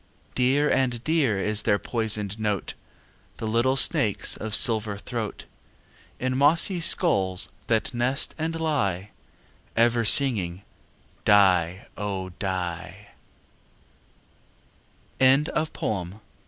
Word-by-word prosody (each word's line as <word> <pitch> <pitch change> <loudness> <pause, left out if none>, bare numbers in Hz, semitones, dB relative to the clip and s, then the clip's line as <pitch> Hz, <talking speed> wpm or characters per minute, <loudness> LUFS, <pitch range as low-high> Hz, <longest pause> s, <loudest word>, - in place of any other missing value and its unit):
Dear 135 +4 +2
and 125 -4 0
dear 145 -8 +1
is 105 +1 +1
their 100 - +2
poisoned 110 -3 -2
note, 105 -3 -2 0.6
The - - -6
little 120 +4 +1
snakes' 135 - +2
of 110 -1 -2
silver 110 -5 +2
throat, 115 0 -6 0.7
In 130 0 -2
mossy 165 +7 +2
skulls 100 - +1 0.2
that 110 0 0
nest 125 +3 0
and 165 +1 -3
lie, 105 - -1 0.7
Ever 120 0 +3
singing 100 -8 +2 0.6
"die, 95 -3 +3
oh! 95 -3 -4
115 Hz, 85 wpm, -25 LUFS, 100-135 Hz, 0.7 s, Ever